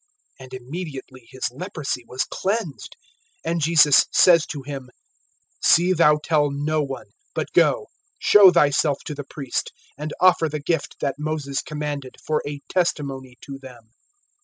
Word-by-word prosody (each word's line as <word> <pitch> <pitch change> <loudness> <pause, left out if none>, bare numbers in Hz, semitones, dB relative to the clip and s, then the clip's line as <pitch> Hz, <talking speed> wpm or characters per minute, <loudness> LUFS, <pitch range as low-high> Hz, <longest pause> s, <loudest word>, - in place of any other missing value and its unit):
And 130 -1 -12
immediately 130 -2 -8
his 130 -2 -4
leprosy 150 -4 -5
was 130 +1 -2
cleansed. 195 -7 -4 0.5
(4)And 170 +1 -1
Jesus 150 -3 +5
says 170 -3 +5
to 145 -3 -6
him: 135 -2 -7 0.7
See 175 +2 +4
thou 150 -3 +4
tell 150 -2 +2
no 150 +2 -1
one; 135 -2 -6 0.2
but - - -3
go, - - +3 0.3
show 200 -3 +7
thyself 145 -2 +2
to - - -5
the 145 0 -6
priest, 140 -1 -4 0.3
and 150 +1 -5
offer 180 -3 +4
the 150 +1 -4
gift 145 0 -2
that 140 +1 -2
Moses 150 -3 -3
commanded, 150 -3 -5
for 155 -1 0
a 145 -1 -6
testimony 135 -8 -2
to 140 -1 -9
them. 120 -4 -14
145 Hz, 145 wpm, -22 LUFS, 135-160 Hz, 0.7 s, show